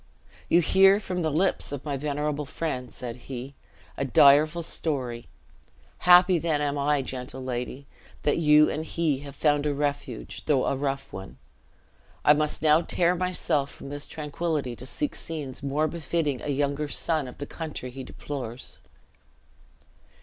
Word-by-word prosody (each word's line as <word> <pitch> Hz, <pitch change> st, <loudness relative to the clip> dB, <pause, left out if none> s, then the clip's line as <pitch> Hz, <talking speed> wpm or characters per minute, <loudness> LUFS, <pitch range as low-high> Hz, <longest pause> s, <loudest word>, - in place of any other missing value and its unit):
"You 170 Hz, -, +5 dB
hear 195 Hz, +4 st, +6 dB
from 180 Hz, -4 st, -3 dB
the 160 Hz, -, +1 dB
lips 170 Hz, +3 st, +1 dB
of 145 Hz, 0 st, -6 dB
my 145 Hz, -2 st, -2 dB
venerable 150 Hz, +1 st, -2 dB
friend," 130 Hz, -5 st, -4 dB
said 120 Hz, -1 st, -6 dB
he, 130 Hz, +1 st, -6 dB, 0.4 s
"a -, -, -1 dB
direful 145 Hz, +5 st, +5 dB
story; 130 Hz, -8 st, -1 dB, 0.7 s
happy 180 Hz, 0 st, +6 dB
then 160 Hz, -2 st, 0 dB
am 145 Hz, -1 st, 0 dB
I, 145 Hz, 0 st, +1 dB
gentle 130 Hz, 0 st, -4 dB
lady, 125 Hz, +2 st, -4 dB, 0.4 s
that 145 Hz, -, +2 dB
you 150 Hz, -1 st, +6 dB
and 155 Hz, -, -2 dB
he 160 Hz, -4 st, 0 dB
have 140 Hz, -1 st, -10 dB
found 145 Hz, 0 st, +2 dB
a 145 Hz, -, 0 dB
refuge, 145 Hz, -4 st, -4 dB
though 135 Hz, -4 st, +3 dB
a -, -, +1 dB
rough 135 Hz, 0 st, -3 dB
one. 95 Hz, -10 st, -8 dB, 0.9 s
I 150 Hz, -, +8 dB
must 150 Hz, +1 st, 0 dB
now 155 Hz, +1 st, +5 dB
tear 175 Hz, +1 st, +2 dB
myself 175 Hz, -6 st, 0 dB
from -, -, -10 dB
this 145 Hz, 0 st, -4 dB
tranquillity 150 Hz, -4 st, -3 dB
to 130 Hz, -, -9 dB
seek 295 Hz, -, -2 dB
scenes 145 Hz, -6 st, -5 dB
more 140 Hz, +3 st, 0 dB
befitting 155 Hz, -4 st, -2 dB
a -, -, -6 dB
younger 145 Hz, +1 st, 0 dB
son 155 Hz, -1 st, -1 dB
of 125 Hz, -, -10 dB
the 145 Hz, -, -5 dB
country 150 Hz, -5 st, -6 dB
he 135 Hz, +1 st, -7 dB
deplores." 130 Hz, -2 st, -7 dB
145 Hz, 155 wpm, -26 LUFS, 135-160 Hz, 0.9 s, I